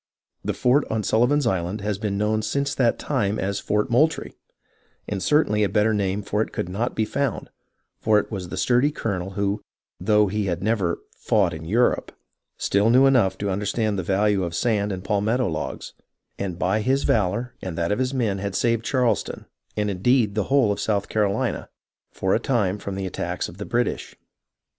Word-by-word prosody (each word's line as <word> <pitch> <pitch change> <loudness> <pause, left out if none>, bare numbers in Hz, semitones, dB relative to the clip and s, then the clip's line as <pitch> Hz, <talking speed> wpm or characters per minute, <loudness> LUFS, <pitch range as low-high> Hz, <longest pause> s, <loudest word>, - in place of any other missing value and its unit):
The - - -2
fort 130 +4 +3
on 110 -1 -1
Sullivan's 125 +7 +2
Island 95 -1 -1
has 105 -1 -2
been 105 -2 -2
known 105 +1 +1
since 140 +6 -1
that 120 -3 +2
time 110 -7 -1
as 100 +1 -1
Fort 105 +4 0
Moultrie, 155 +7 +2 0.7
and 100 -2 -3
certainly 105 -8 +3
a 100 - +2
better 105 +1 +2
name 100 0 -1
for 105 +1 -1
it - - -2
could - - -3
not 105 +7 -2
be 110 - +1
found, 140 +1 -2 0.5
for 110 -1 +3
it 105 - -1
was 95 -4 -5
the - - -5
sturdy 125 +4 +3
colonel 95 -9 -3
who, 100 +1 0 0.4
though 105 -1 +3
he 105 +1 -1
had 90 0 -2
never 100 -6 +1
" - - -31
fought - - +3
in 80 0 -7
Europe," 115 +8 +1 0.5
still 100 +3 +2
knew 130 +3 +6
enough 125 -8 +3
to 100 -1 -2
understand 105 +1 -1
the - - 0
value 100 +2 +1
of 85 -1 -3
sand 105 -4 +1
and 90 -1 -5
palmetto 110 +5 +1
logs, 80 -4 -4 0.5
and 95 -4 -3
by 95 +5 +1
his 135 +5 +1
valour 115 +4 +1
and 90 -3 -5
that 85 +2 0
of 105 - 0
his 130 0 0
men 115 -7 0
had 100 0 -3
saved 115 -1 +1
Charleston, 125 -3 0 0.3
and 105 -1 0
indeed 110 +3 +2
the 105 -1 0
whole 135 -6 +3
of 100 - -2
South 100 -2 0
Carolina, 105 -2 0 0.4
for 95 0 0
a - - +3
time 105 -6 0
from 100 -1 -5
the 95 0 -3
attacks 95 - -3
of 90 - -12
the 100 - -4
British. 120 +1 -1
105 Hz, 195 wpm, -24 LUFS, 100-120 Hz, 0.7 s, knew